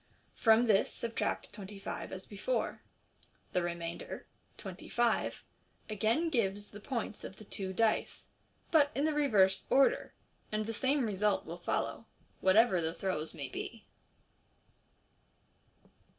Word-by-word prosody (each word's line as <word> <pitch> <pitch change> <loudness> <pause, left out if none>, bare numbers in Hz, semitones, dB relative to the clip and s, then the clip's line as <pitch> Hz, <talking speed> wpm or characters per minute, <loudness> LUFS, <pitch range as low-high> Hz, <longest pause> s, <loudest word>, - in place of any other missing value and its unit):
From 225 +1 +5
this 210 -4 +3
subtract 230 -1 -2
twenty 205 -1 -7
five 195 - -5
as 190 0 -6
before. 220 +4 -2 0.7
The 180 - +2
remainder, 170 -1 -4 0.3
twenty - - -8
five, 240 -1 +1 0.5
again 225 - +2
gives 205 -5 0
the 205 - -10
points 225 -2 -4
of 190 - -7
the 215 - -12
two 190 -1 -3
dice, 220 +3 +1 0.5
but 295 -3 +6
in 280 - +1
the 310 - +2
reverse 210 -11 +3
order 275 - +3 0.3
j 215 - -1
and 215 - -1
the 225 - -3
tame 265 +3 +2
result 210 -1 +1
will 170 +2 -7
follow, 225 +5 -2 0.3
whatever 190 -1 +5
the 160 +1 -2
throws 175 -5 -2
may 140 - -4
be. 225 - -6
210 Hz, 135 wpm, -33 LUFS, 190-235 Hz, 0.7 s, but